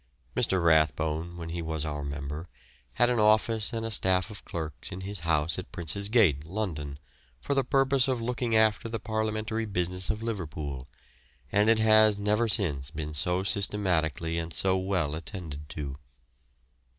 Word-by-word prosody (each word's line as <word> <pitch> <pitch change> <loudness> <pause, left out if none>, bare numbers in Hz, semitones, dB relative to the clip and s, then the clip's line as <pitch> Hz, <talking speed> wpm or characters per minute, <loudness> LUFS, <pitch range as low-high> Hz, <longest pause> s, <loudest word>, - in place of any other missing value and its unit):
Mr. 95 -2 +2
Rathbone, 80 +2 +2
when 85 -1 -6
he 85 +1 -4
was 80 -1 -2
our 75 -1 -4
member, 70 +3 -5 0.5
had 120 - +3
an 120 - +1
office 110 +1 +3
and 115 -2 -3
a 115 - -3
staff 95 0 +2
of 105 - -10
clerks 80 -5 -5
in 90 - -6
his 100 +1 -5
house 80 +1 +1
at 95 - -8
Prince's 90 +4 -2
Gate, 95 - +4
London, 80 -6 -4 0.4
for 100 - -2
the 135 -1 +2
purpose 135 0 +3
of 130 -2 0
looking 120 0 -1
after 110 +1 +3
the 115 0 -3
parliamentary 110 +1 -2
business 90 -2 -1
of 110 +1 -2
Liverpool, 75 - -4 0.6
and 105 +2 +3
it 115 - +5
has 110 -1 +5
never 105 +3 +1
since 75 -11 +1
been 75 -1 -5
so 90 +5 0
systematically 90 -6 +1
and 85 0 -5
so 95 -1 +2
well 95 -5 -1
attended 80 -3 -7
to. 70 -2 -6
95 Hz, 160 wpm, -28 LUFS, 80-110 Hz, 0.6 s, it